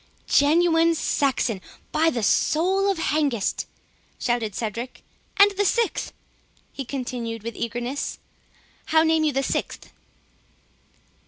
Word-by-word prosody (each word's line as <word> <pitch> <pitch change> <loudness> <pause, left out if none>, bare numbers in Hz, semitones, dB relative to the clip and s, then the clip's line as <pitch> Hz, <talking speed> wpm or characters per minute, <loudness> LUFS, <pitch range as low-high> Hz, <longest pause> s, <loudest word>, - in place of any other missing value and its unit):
"Genuine 330 +2 +4
Saxon, 260 -9 0 0.3
by 320 +1 +3
the 240 -8 -2
soul 375 - +2
of 390 - 0
Hengist!" 290 -9 0 0.5
shouted 235 -5 -1
Cedric—"And 245 - 0
the 400 +1 0
sixth?" 430 -2 0 0.6
he 275 - -5
continued 240 -4 -5
with 230 +1 -5
eagerness—"how 250 +6 -3
name 320 -1 +3
you 305 - +2
the 270 0 0
sixth?" - - -3
285 Hz, 100 wpm, -24 LUFS, 240-325 Hz, 0.6 s, Genuine